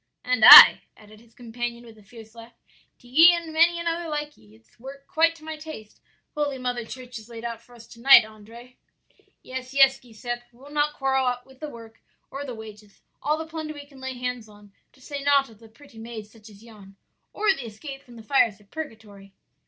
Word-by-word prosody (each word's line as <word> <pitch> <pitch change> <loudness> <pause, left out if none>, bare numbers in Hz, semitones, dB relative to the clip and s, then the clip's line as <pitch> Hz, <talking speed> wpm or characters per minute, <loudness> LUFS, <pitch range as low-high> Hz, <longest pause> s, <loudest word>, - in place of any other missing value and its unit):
"'And 250 -3 0
I,' - - +11 0.2
added 215 0 -18
his 230 0 -24
companion 240 0 -7
with 225 -1 -15
a 215 - -19
fierce 220 +1 -16
laugh; 230 0 -14 0.4
'to 245 - -21
ye 325 +8 +6
and 335 -2 -7
many 340 +2 +3
another 335 0 -4
like 295 0 -5
ye. 105 0 -22
It's 110 - -28
work 275 +3 -12
quite 330 +1 +1
to 320 - -18
my 315 0 -7
taste 305 -9 -12 0.3
Holy 290 -2 -3
Mother 245 -2 -4
Church 250 +1 -10
has 220 +1 -14
laid 230 0 -10
out 235 -1 -6
for 245 - -20
us 230 -1 -15
to 230 - -15
night, 270 -3 +7
Andrea.' 225 +3 -15 0.7
"'Yes, 255 +1 -8
yes, 270 -1 +4
Giuseppe, 240 +1 -8
we'll 270 +4 -17
not 295 0 -1
quarrel 265 -2 0
with 265 -1 -20
the 305 - -7
work 230 -3 -14 0.3
or 275 +1 -6
the 255 -4 -8
wages; 210 -2 -14 0.2
all 300 +2 -1
the 320 - -6
plunder 315 -1 -7
we 290 -1 -11
can 280 -2 -18
lay 260 0 -6
hands 250 -3 -6
on; 205 -1 -19 0.2
to - - -25
say 280 +2 -8
naught 280 -3 +2
of 215 - -20
the 225 -1 -17
pretty 230 0 -18
maids 225 -2 -10
such 220 -1 -17
as 205 +1 -18
yon, 205 -4 -16 0.4
or 420 -1 +1
the 250 -9 -8
escape 270 +6 -10
from 240 -3 -18
the 225 - -13
fires 230 -4 +1
of 205 -1 -26
purgatory.' 215 -10 -10
245 Hz, 215 wpm, -24 LUFS, 225-285 Hz, 0.7 s, I